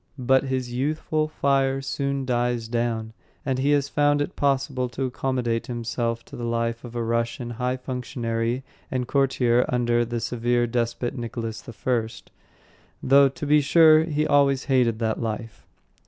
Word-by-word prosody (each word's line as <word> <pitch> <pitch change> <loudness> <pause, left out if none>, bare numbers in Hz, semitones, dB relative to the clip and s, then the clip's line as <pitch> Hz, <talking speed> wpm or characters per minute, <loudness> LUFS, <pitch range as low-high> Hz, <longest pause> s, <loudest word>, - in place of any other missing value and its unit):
But 130 +1 +2
his 130 -2 -2
youthful 155 +3 -1
fire 135 -3 +1
soon 140 0 -2
died 120 -2 -1
down, 115 -2 -1 0.3
and 130 -2 -1
he 145 +2 +3
found 145 +1 +1
it 145 - -3
possible 135 -2 0
to 125 +3 -4
accommodate 125 -2 -1
himself 115 -1 -3
to - - -11
the 120 - -6
life 115 0 -1
of 120 -1 -9
a 120 - -1
Russian 115 +1 -2
high 125 +2 -2
functionary 125 -1 -3 0.3
and 125 -2 -2
courtier 125 -3 +2
under 120 -1 +2
the 120 0 -3
severe 120 +1 0
despot 120 0 -2
Nicholas 115 -2 -5
I, 115 -1 -1 0.9
though, 140 +1 +6
to 150 +3 -7
be 150 +1 +4
sure, 155 +1 +6
he 155 -2 0
always 140 -2 +3
hated 125 -5 +2
that 110 0 -1
life. 115 -1 -5
125 Hz, 150 wpm, -24 LUFS, 115-135 Hz, 0.9 s, though